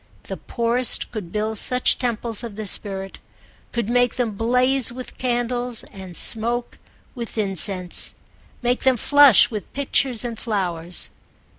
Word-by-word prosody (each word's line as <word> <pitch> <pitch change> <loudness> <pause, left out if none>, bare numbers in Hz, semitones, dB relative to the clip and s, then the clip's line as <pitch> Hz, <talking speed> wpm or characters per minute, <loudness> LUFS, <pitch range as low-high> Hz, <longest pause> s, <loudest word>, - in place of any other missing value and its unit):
The - - -6
poorest 235 +1 +1
could 205 -7 -6
build 215 0 -2
such 250 0 +3
temples 235 -2 -2
of 230 -4 -7
the 215 0 -5
spirit—could 195 +3 -3
make 245 0 +2
them 245 -3 0
blaze 250 +4 +1
with 250 +1 -9
candles 245 -1 -2
and 190 -3 -9
smoke 235 +2 0 0.3
with 235 -3 -6
incense, 190 -3 -1 0.5
make 245 +1 +1
them 260 -1 +3
flush 285 -1 +6
with 210 -2 -6
pictures 265 -3 0
and 230 -2 -5
flowers. 180 -6 -2
235 Hz, 130 wpm, -22 LUFS, 205-245 Hz, 0.5 s, flush